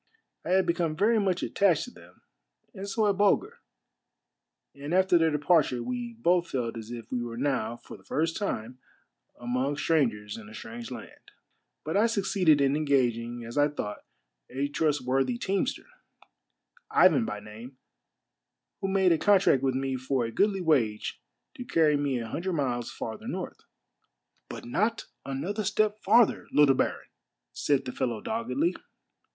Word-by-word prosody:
I - - -6
had 190 -1 +4
become 170 -2 0
very 215 +6 +3
much 190 -3 0
attached 195 -5 +2
to 250 - -9
them, - - -18 0.5
and 200 -1 -7
so 215 +2 +1
had 200 -2 +1
Bulger, 405 - +2 1.1
and 145 +3 -6
aft^r 185 -1 +4
their 165 0 +3
departure 150 -4 +2
we 245 -1 -4
both 180 -6 +1
felt 120 -3 -2
as 115 -1 -8
if 120 -1 -8
we 125 - -1
were 120 -1 -5
now, 125 -4 -1
for - - -12
the - - -22
first 165 +2 -1
time, 125 - -4 0.6
among 125 +4 -1
strangers 115 -12 0
in 110 -2 -11
a 110 - -11
strange 115 +1 -8
land; 120 -3 -10 0.6
but 160 - -2
I 215 +3 +4
succeeded 190 -8 +2
in 140 0 +3
engaging, 120 -5 0
as 120 +5 -3
I 145 - +5
thought, 110 -8 -5 0.5
a 140 +2 -2
trust 150 0 0
worthy 135 - +1
teamster, 195 -4 -1 1.0
Ivan - - +5
by 105 - -4
name, 110 +5 -11 1.0
who 195 - -2
made 190 -1 +3
a 165 - +3
contract 195 -10 +4
with 135 -1 0
me 135 0 -1
for 130 -1 -1
a 115 - -4
goodly 195 - +1
wage 125 -11 0 0.3
to 265 -5 -7
carry 160 -9 +3
me 140 -3 0
a 115 -1 -4
hundred 175 +10 -3
miles 125 -6 -1
farther 110 -1 -6
north. - - -5 0.5
" - - -48
But - - -8
not 215 - 0 0.2
another 180 +11 -3
step 215 +1 +1
farther, 225 +3 +3
little 145 -2 +5
baron! - - -1 0.3
" - - -59
said 140 -2 0
the 125 - -4
fellow 120 -4 -2
doggedly. 235 - -1
145 Hz, 165 wpm, -28 LUFS, 125-195 Hz, 1.1 s, I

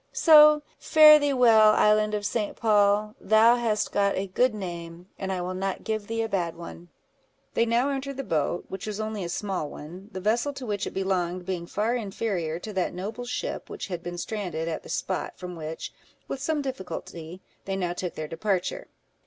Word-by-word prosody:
So 300 -2 +7 0.2
fare 305 -1 +8
thee 290 -1 +1
well, 225 -5 +6
Island 215 0 +3
of 205 -1 -3
St. 210 0 -2
Paul; 210 -1 +2
thou 220 +3 +5
hast 220 -3 0
got 200 0 +1
a 190 - -1
good 220 +5 +1
name, 170 -3 -7
and 190 -1 -3
I 185 -1 -2
will 180 +1 -3
not 190 +1 -3
give 215 -2 -3
thee 225 0 -1
a - - -2
bad 175 -6 -2
one." 170 0 -10 0.6
They 230 - +2
now 240 +4 +2
entered 275 0 -4
the 275 - -3
boat, 160 - -1
which 190 +2 -7
was 210 0 -4
only 215 -2 -3
a 170 - -4
small 185 -4 -3
one, 180 +9 -10
the 190 - -5
vessel 235 +8 0
to 270 -2 -7
which 205 -3 -2
it - - -8
belonged 185 -2 -1
being 175 -2 -4
far 215 +6 -1
inferior 195 -7 -2
to 215 - -7
that 185 -2 -1
noble 215 +7 -5
ship 245 - -4
which 420 - -6
had 175 -2 -4
been 175 0 -6
stranded 175 -5 -4
at 160 -2 -3
the - - -13
spot 190 - -3
from 180 -1 -7
which, 160 0 -6 0.3
with 265 - -5
some 295 0 -1
difficulty, 185 -8 -7 0.2
they 195 - -2
now 180 -2 -1
took 180 0 -5
their 155 - -5
departure. 195 - -2
200 Hz, 200 wpm, -26 LUFS, 180-230 Hz, 0.6 s, fare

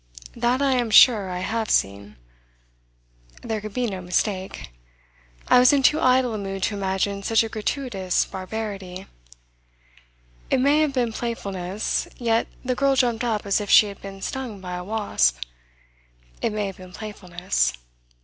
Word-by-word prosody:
That 245 +3 +1
I 275 - +3
am 240 -2 0
sure 215 -3 +6
I 180 0 -4
have 220 +3 -2
seen! 100 +1 0 1.3
There 220 -2 -3
could 215 -1 -8
be 250 -1 0
no 195 -5 -4
mistake. 185 - -2 0.8
I 250 - +6
was 250 0 +6
in 275 -1 +2
too 305 +4 +4
idle 255 -2 +3
a 215 - -3
mood 195 -1 -5
to - - 0
imagine 200 0 -1
such 225 +3 +2
a 225 - -4
gratuitous 215 -4 -1
barbarity. 190 -1 -6 1.4
It - - +2
may 285 +4 +4
have 305 -3 +1
been 240 -4 0
playfulness, 200 -4 -3
yet 230 -1 +1 0.2
the 255 - +1
girl 275 +2 +2
jumped 245 -2 +1
up 220 -4 -1
as 200 +1 +1
if 205 - -6
she 210 - +7
had 200 - -11
been 195 -1 -9
stung 255 -6 -5
by 180 -1 -7
a 180 0 -4
wasp. 195 - +1 1.0
It - - +1
may 210 -1 -2
have 195 -2 -6
been 185 -1 -13
playfulness. 190 -3 -2
210 Hz, 160 wpm, -23 LUFS, 190-240 Hz, 1.4 s, she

